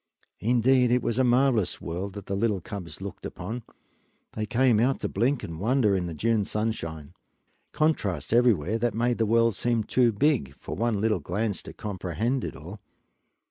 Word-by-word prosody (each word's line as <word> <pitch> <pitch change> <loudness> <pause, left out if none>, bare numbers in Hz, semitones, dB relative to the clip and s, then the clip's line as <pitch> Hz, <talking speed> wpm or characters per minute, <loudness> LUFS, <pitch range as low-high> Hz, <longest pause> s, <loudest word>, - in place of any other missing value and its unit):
Indeed 125 +2 +3
it 125 0 +2
was 120 +2 0
a - - +4
marvelous 125 -4 +2
world 90 +4 -5
that 100 -2 -8
the 100 - -4
little 105 -1 +1
cubs 90 -2 -8
looked 100 -1 -7
upon 95 +7 -5
when - - -31 0.7
they 110 - -3
came 120 -1 +3
out 130 +4 +2
to - - 0
blink 125 +7 0
and 80 -1 -6
wonder 110 -1 +2
in 90 -2 -1
the 85 - -6
June 110 +5 +1
sunshine. 85 -9 -3 0.6
Contrasts 150 - 0
everywhere, 115 -4 +3
that 120 -2 0
made 120 +1 0
the 110 - +2
world 115 +1 +3
seem 120 +1 0
too 120 +2 +3
big 115 - +1
for - - -7
one 115 -3 0
little 105 -2 +1
glance 100 +6 -2
to - - -10
comprehend 105 - -2
it - - -5
all. 85 +10 -9
110 Hz, 180 wpm, -26 LUFS, 95-120 Hz, 0.7 s, a